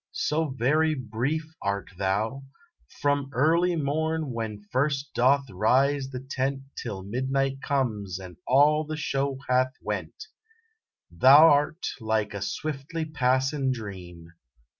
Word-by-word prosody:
So 160 Hz, +1 st, 0 dB
very 150 Hz, +5 st, +1 dB
brief 135 Hz, +6 st, -3 dB
art 100 Hz, 0 st, -2 dB
thou, 105 Hz, +8 st, -1 dB, 0.6 s
From 145 Hz, -1 st, +1 dB
early 170 Hz, +6 st, +3 dB
morn 160 Hz, 0 st, -1 dB
when 110 Hz, -3 st, -5 dB
first 140 Hz, +2 st, 0 dB
doth 135 Hz, +3 st, +3 dB
rise 135 Hz, +8 st, +2 dB
the 130 Hz, -2 st, -6 dB
tent 135 Hz, 0 st, -2 dB
Till 100 Hz, -5 st, -5 dB
midnight 135 Hz, +5 st, -1 dB
comes 110 Hz, -11 st, -1 dB
and 90 Hz, -2 st, -10 dB
all 150 Hz, +4 st, +4 dB
the 155 Hz, 0 st, -5 dB
show 140 Hz, -2 st, -1 dB
hath 130 Hz, 0 st, +2 dB
went; 425 Hz, -, -5 dB, 0.9 s
Thou 140 Hz, -, +7 dB
rt 150 Hz, +4 st, -1 dB
like 110 Hz, -2 st, -1 dB
a 100 Hz, -, -5 dB
swiftly 155 Hz, -, -4 dB
passin 135 Hz, -1 st, +1 dB
dream. 95 Hz, -8 st, -7 dB
135 Hz, 120 wpm, -26 LUFS, 110-150 Hz, 0.9 s, Thou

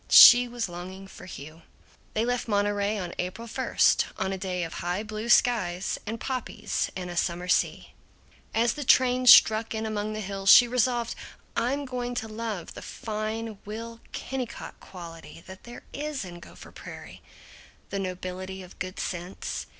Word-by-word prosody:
She 245 Hz, 0 st, +10 dB
was 240 Hz, -2 st, -3 dB
longing 185 Hz, +2 st, -8 dB
for 190 Hz, -, -12 dB
Hugh. 155 Hz, -1 st, -10 dB, 0.5 s
They 220 Hz, +1 st, +2 dB
left 245 Hz, 0 st, -1 dB
Monterey 205 Hz, 0 st, +1 dB
on 180 Hz, -3 st, -4 dB
April 190 Hz, +6 st, -4 dB
first, -, -, +2 dB
on 190 Hz, 0 st, -1 dB
a -, -, -1 dB
day 180 Hz, -2 st, -2 dB
of 165 Hz, -, -5 dB
high 180 Hz, +4 st, -2 dB
blue 215 Hz, +1 st, -5 dB
skies 195 Hz, -7 st, +2 dB
and 225 Hz, +2 st, -3 dB
poppies 225 Hz, -5 st, -2 dB
and 180 Hz, -1 st, -5 dB
a -, -, -7 dB
summer 175 Hz, +1 st, -1 dB
sea. -, -, 0 dB, 0.6 s
As 230 Hz, +1 st, +2 dB
the 295 Hz, -, -5 dB
train 255 Hz, -1 st, +4 dB
struck 220 Hz, -1 st, +7 dB
in 220 Hz, 0 st, -2 dB
among 215 Hz, 0 st, -2 dB
the 215 Hz, -, -4 dB
hills 195 Hz, -1 st, -2 dB
she 245 Hz, -, +10 dB
resolved, 240 Hz, -1 st, +1 dB, 0.4 s
"I'm 275 Hz, +4 st, 0 dB
going 245 Hz, -1 st, -4 dB
to 225 Hz, -, -3 dB
love 215 Hz, -4 st, -5 dB
the -, -, -9 dB
fine 215 Hz, 0 st, -4 dB
Will 230 Hz, +2 st, -7 dB
Kennicott 255 Hz, -3 st, -5 dB
quality 165 Hz, -3 st, -11 dB
that 190 Hz, 0 st, -12 dB
there 240 Hz, 0 st, -10 dB
is 290 Hz, -5 st, -4 dB
in 175 Hz, -1 st, -9 dB
Gopher -, -, -13 dB
Prairie. -, -, -10 dB, 0.7 s
The 200 Hz, -, -2 dB
nobility 185 Hz, 0 st, -5 dB
of 180 Hz, -, -15 dB
good 185 Hz, +1 st, -5 dB
sense. 180 Hz, +1 st, -4 dB
215 Hz, 165 wpm, -27 LUFS, 185-235 Hz, 0.7 s, She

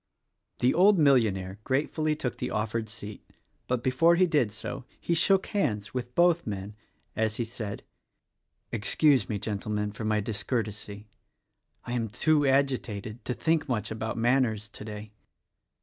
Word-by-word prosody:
The 125 Hz, -, +4 dB
old 195 Hz, +3 st, +5 dB
millionaire 105 Hz, -, +2 dB
gratefully 150 Hz, +4 st, 0 dB
took 130 Hz, -5 st, -3 dB
the -, -, -3 dB
offered 110 Hz, +1 st, -2 dB
seat; 105 Hz, -2 st, -9 dB, 0.4 s
but 125 Hz, -1 st, -1 dB
before 165 Hz, +7 st, +4 dB
he 185 Hz, +2 st, +5 dB
did 145 Hz, -11 st, +2 dB
so 110 Hz, +5 st, -6 dB, 0.2 s
he 170 Hz, -, -1 dB
shook 190 Hz, +3 st, +3 dB
hands 110 Hz, -, -1 dB
with 125 Hz, -1 st, -4 dB
both 175 Hz, -3 st, +3 dB
men, 100 Hz, 0 st, -5 dB, 0.4 s
as 110 Hz, -1 st, 0 dB
he 120 Hz, -, -1 dB
said, 110 Hz, -3 st, -6 dB, 0.9 s
"Excuse 125 Hz, -, +2 dB
me, 105 Hz, -, -1 dB
Gentlemen, 105 Hz, 0 st, -2 dB
for 110 Hz, -, -7 dB
my 110 Hz, 0 st, +1 dB
discourtesy, 105 Hz, -1 st, -3 dB, 0.4 s
— -, -, -41 dB
I 120 Hz, -, -4 dB
am 115 Hz, -3 st, -1 dB
too 145 Hz, +6 st, +2 dB
agitated 125 Hz, -5 st, 0 dB
to 125 Hz, -, -2 dB
think 160 Hz, -2 st, +1 dB
much 110 Hz, -4 st, -1 dB
about 110 Hz, 0 st, -3 dB
manners 115 Hz, -3 st, +1 dB
today." 105 Hz, 0 st, -8 dB
115 Hz, 150 wpm, -28 LUFS, 105-140 Hz, 0.9 s, old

